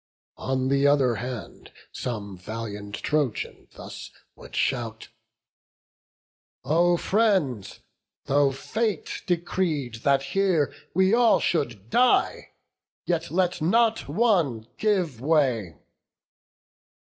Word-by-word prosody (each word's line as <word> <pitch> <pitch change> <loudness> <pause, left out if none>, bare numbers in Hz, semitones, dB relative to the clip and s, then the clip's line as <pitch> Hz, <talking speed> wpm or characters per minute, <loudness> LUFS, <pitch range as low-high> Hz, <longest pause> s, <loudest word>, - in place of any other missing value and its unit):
On 130 0 -1
th' 140 +1 +3
other 140 -4 +3
hand 125 0 -7 0.2
some 105 -5 -5
valiant 105 +1 -6
Trojan 145 -7 -2
thus - - -9 0.3
Would - - -12
shout: 115 -3 -2 1.5
"O 170 +5 +3
friends, 185 - 0 0.4
tho' 140 0 +3
fate 215 - -3
decreed 170 -8 -1
that 140 0 +2
here 185 -7 +2 0.2
We 190 +2 +4
all 235 -1 +5
should 120 - -2
die, 250 0 +2 0.6
yet 170 -1 -1
let 180 0 0
not 225 +7 +2
one 165 - +1
give 185 - 0
way." 130 - +1
145 Hz, 95 wpm, -25 LUFS, 120-185 Hz, 1.5 s, all